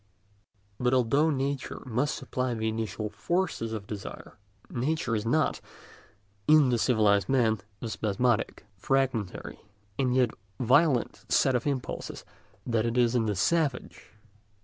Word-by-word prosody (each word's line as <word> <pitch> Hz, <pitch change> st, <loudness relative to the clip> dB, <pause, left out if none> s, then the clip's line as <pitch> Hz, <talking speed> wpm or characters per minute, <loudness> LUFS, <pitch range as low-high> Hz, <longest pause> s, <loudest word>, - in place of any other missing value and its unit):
But 125 Hz, +1 st, +2 dB
although 140 Hz, +6 st, +3 dB
nature 140 Hz, -1 st, -2 dB
must 130 Hz, +5 st, 0 dB
supply 125 Hz, -2 st, -2 dB
the 110 Hz, 0 st, -2 dB
initial 110 Hz, -1 st, -2 dB
force 175 Hz, -, -1 dB
of 110 Hz, -3 st, -4 dB
desire, 100 Hz, -1 st, -8 dB, 0.3 s
nature 125 Hz, -1 st, -1 dB
is 110 Hz, +1 st, -2 dB
not, 155 Hz, +6 st, +1 dB, 0.9 s
in 150 Hz, -3 st, +6 dB
the 120 Hz, -2 st, +1 dB
civilised 105 Hz, -5 st, +3 dB
man, 115 Hz, -5 st, +3 dB, 0.2 s
the 115 Hz, -, -4 dB
spasmodic, 110 Hz, +2 st, 0 dB
fragmentary, 130 Hz, -6 st, -1 dB, 0.4 s
and 130 Hz, -2 st, +2 dB
yet 125 Hz, -3 st, +3 dB, 0.3 s
violent 130 Hz, +1 st, +3 dB
set 135 Hz, -, +3 dB
of 125 Hz, +2 st, 0 dB
impulses 135 Hz, -3 st, -4 dB, 0.4 s
that 115 Hz, -2 st, +1 dB
it 115 Hz, +1 st, -1 dB
is 120 Hz, -1 st, +3 dB
in 115 Hz, -3 st, +1 dB
the 105 Hz, -, 0 dB
savage. 145 Hz, -, -1 dB
125 Hz, 130 wpm, -28 LUFS, 110-135 Hz, 0.9 s, in